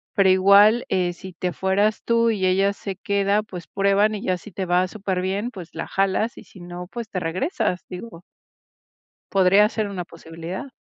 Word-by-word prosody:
pero 195 -1 +4
igual, 200 +5 +6
eh, 180 -2 0
si 185 +1 -10
te 180 +2 -3
fueras 195 +5 +1
tú 230 0 +3
y 205 -4 0
ella 195 +2 +3
se 200 -1 -6
queda, 200 +2 0
pues, 180 -5 -9
prueban 200 +2 +2
y 205 - -6
ya 185 -1 0
si 195 +3 -13
te 190 - -3
va 180 +1 +2
superbién, 195 +2 -2
pues, 185 -7 -9
la 165 - -4
jalas 195 +4 0
y - - -11
si 185 - -15
no, 175 0 -8
pues, 230 0 -7
te 185 - -3
regresas, 180 - -2
digo 180 -1 -9 1.1
podría 195 +2 +5
ser 215 -1 -2
una 185 -3 -5
posibilidad. 165 +4 -8
190 Hz, 185 wpm, -23 LUFS, 180-205 Hz, 1.1 s, igual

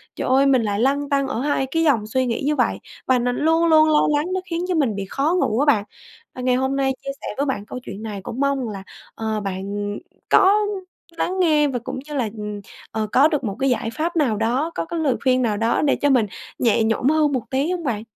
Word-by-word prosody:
trời - - -3
ơi, 265 +2 +4
mình 265 -3 +4
lại 205 -1 -1
lăn 280 +4 +1
tăn 275 -1 +1
ở 265 -4 -3
hai 285 -1 0
cái 325 0 +1
dòng 240 -9 +2
suy 260 +4 0
nghĩ 235 -2 -2
như 300 +1 +1
vậy. - - +1 0.3
Và 255 -1 +3
nó 245 +1 0
luôn 325 +5 +2
luôn 315 -1 +5
lo 300 -1 +4
lắng 295 - 0
nó 375 - -1
khiến 345 +1 -2
cho 365 - 0
mình 270 -9 +1
bị 200 -1 -4
khó 300 +6 0
ngủ 235 - +1
á 290 - +3
bạn. 240 -9 +3 0.5
Và 255 - -6
ngày 250 0 +2
hôm 265 +1 0
nay 270 -1 +1
chia 275 - -2
sẻ - - -6
với 280 - 0
bạn 255 -7 -2
câu 250 - -7
chuyện 215 -1 -8
này 210 -2 -5
cũng 235 - -6
mong 280 -1 +1
rằng 245 - -3
là, 195 -2 -7 0.3
ờ, 220 -1 -2
bạn, 195 -2 -4
ừm, 205 0 -3 0.3
có 405 +2 +5 0.6
lắng 375 +3 -1
nghe 305 -4 +4
và 255 -3 -2
cũng 260 0 -5
như 300 - -8
là, 240 -5 0
ừm, 210 -1 -5 0.3
ờ, 215 -1 -2
có 275 +4 +6
được 300 -4 -1
một 200 -3 -3
cái 270 - +2
giải 235 -2 0
pháp 335 +3 -2
nào 255 -10 +1
đó, 250 +9 0
có - - -2
cái 335 +1 -4
lời 290 -5 +1
khuyên 255 -1 +3
nào 220 -4 0
đó 225 +2 +1
để 290 - +2
cho 290 - +1
mình 250 -5 +4 0.3
nhẹ 230 -2 +3
nhõm 225 +4 +1
hơn 305 -2 +3
một 255 - 0
tí 275 +6 0
hông 355 -2 -3
bạn? 225 -7 -2
265 Hz, 265 wpm, -22 LUFS, 225-300 Hz, 0.6 s, có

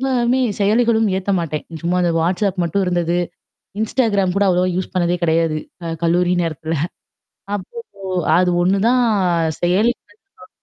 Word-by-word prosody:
எல்லாமே 255 -1 +1 0.2
செயலிகளும் 225 +1 +3
ஏத்த 190 +1 -3
மாட்டேன். 155 -2 -4 0.2
சும்மா 175 +2 0
அந்த 175 - +1
வாட்ஸ்அப் 185 +2 0
மட்டும் 190 +4 0
இருந்தது. 175 -1 0 0.6
இன்ஸ்டாகிராம் 210 -5 +1
கூட 200 - +3
அவ்ளவோ 180 0 +2
யூஸ் 185 - -3
பண்ணதே 175 -1 +1
கிடையாது. 160 -1 +1 0.3
க 165 -1 -3
கல்லூரி 175 +2 +2
நேரத்துல. 160 0 -3 0.8
அப்போ 195 - -11 0.3
ஓ! - - -8 0.3
அது 180 -1 +3
ஒண்ணுதான் 200 +7 +2 0.6
செயல 180 +5 +2 0.5
நான். 255 - -15
180 Hz, 135 wpm, -19 LUFS, 170-215 Hz, 0.8 s, செயலிகளும்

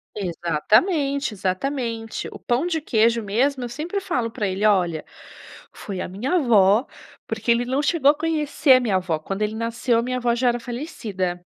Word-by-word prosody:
Exatamente, 215 - +1
exatamente. 225 +4 -3
O - - -9
pão 250 +8 -1
de 325 -2 -1
queijo 230 -4 +2
mesmo, 250 +6 0
eu 240 - -4
sempre 320 +10 -3
falo 250 -12 -2
pra 210 -2 -3
ele: 190 +2 -3
"Olha, 175 -7 +2 0.7
foi 190 -3 -6
a - - -4
minha 225 - -2
avó", 220 - +4 0.4
porque 225 +1 -4
ele 235 +1 +3
não 265 +3 0
chegou 295 -3 +4
a 295 - -6
conhecer 300 -3 +2
a 255 - +6
minha 215 -6 +1
avó, 180 -4 -1
quando 195 +6 -5
ele 210 +1 -1
nasceu, 230 +1 0
a 230 - +1
minha 255 0 -2
avó 240 -1 +1
já 245 0 +2
era 240 0 -1
falecida. 220 - -4
235 Hz, 185 wpm, -23 LUFS, 200-275 Hz, 0.7 s, a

